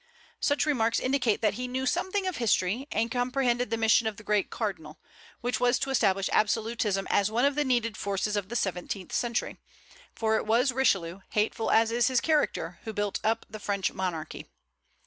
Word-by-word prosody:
Such 285 +1 +1
remarks 230 -6 +1
indicate 255 -5 0
that 210 -2 +3
he 250 +4 -4
knew 260 +1 -2
something 375 +7 0
of 370 -2 -2
history, 230 +2 +1
and 225 +2 0
comprehended 245 0 0
the 230 - -1
mission 225 0 +3
of 215 -2 -3
the 215 - -11
great 210 -1 +1
cardinal, 160 -9 -4 0.4
which 245 +1 -1
was 245 0 +3
to 270 - -2
establish 195 -6 +2
absolutism 215 -2 +1
as 200 0 +3
one 235 +4 +1
of 285 - +3
the 295 +1 +1
needed 240 -5 0
forces 200 +1 -2
of 200 -2 -2
the 240 - -5
seventeenth 185 -2 -3
century; 235 -1 -1 0.6
for 220 -1 +1
it - - -4
was 240 +5 +3
Richelieu, 195 -9 +1
hateful 220 +1 0
as 225 0 +4
is 235 0 +2
his 255 -2 +3
character, 295 - 0
who 220 - -5
built 205 -1 -2
up 225 +1 0
the 215 - -9
French 200 -2 -1
monarchy. 180 -5 -4
225 Hz, 185 wpm, -28 LUFS, 205-250 Hz, 0.6 s, as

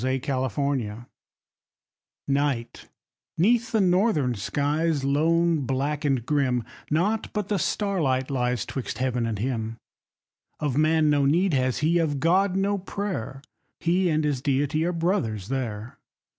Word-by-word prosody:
THE 130 +1 +1
CAMPER 130 -4 -2 1.2
Night 140 -4 -1 0.5
'neath 230 +7 +2
the 225 - +2
northern 180 - +2
skies, 145 +7 0
lone, 165 +4 +2
black, 140 +3 -1
and 135 -5 0
grim: 130 -5 +1 0.3
Naught 195 +8 0
but 210 -2 -2
the 205 -2 +1
starlight 150 -10 0
lies 125 -3 0
'twixt 130 - -5
heaven, 125 -2 0
and 110 -2 -2
him. 115 0 -3 0.8
Of 145 -4 -1
man 155 0 +3
no 145 -1 +3
need 175 +5 +2
has 130 -2 +1
he, 170 +2 +3
of 150 -4 0
God, 185 +5 +2
no 200 +1 +1
prayer; 180 - -5 0.4
He 175 +2 +2
and 155 -1 +1
his 145 -4 0
Deity 145 +2 +1
are 175 - +1
brothers 165 - -1
there. 120 -4 -4
145 Hz, 135 wpm, -25 LUFS, 130-170 Hz, 1.2 s, man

